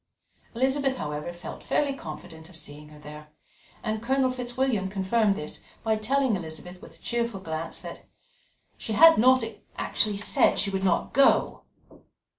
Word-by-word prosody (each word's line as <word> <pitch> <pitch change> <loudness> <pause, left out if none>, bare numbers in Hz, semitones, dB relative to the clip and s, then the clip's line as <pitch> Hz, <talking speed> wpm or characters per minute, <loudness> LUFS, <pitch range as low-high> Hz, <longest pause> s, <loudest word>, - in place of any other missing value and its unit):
Elizabeth, 265 +2 +1
however, 150 +2 -4
felt 175 0 -9
fairly 285 -2 0
confident 160 - -9
of 185 - -11
seeing 150 -1 -8
her 150 - -14
there, 150 0 -11 0.6
and 215 -1 -2
Colonel 260 +2 +1
Fitzwilliam 245 -5 -1
confirmed 200 +2 +1
this 150 - -6 0.2
by 220 -1 +2
telling 250 +2 +1
Elizabeth 180 +1 -7
with 165 - -13
a - - -26
cheerful 235 -4 -1
glance 165 -2 -5
that - - -10 0.7
"she 220 - -4
had 325 +6 +8
not 255 +1 +5 0.3
actually 210 -2 0
said 205 - +3
she 200 - +1
would 190 0 -2
not 185 -3 +1
go." 275 0 +3
205 Hz, 150 wpm, -26 LUFS, 165-255 Hz, 0.7 s, had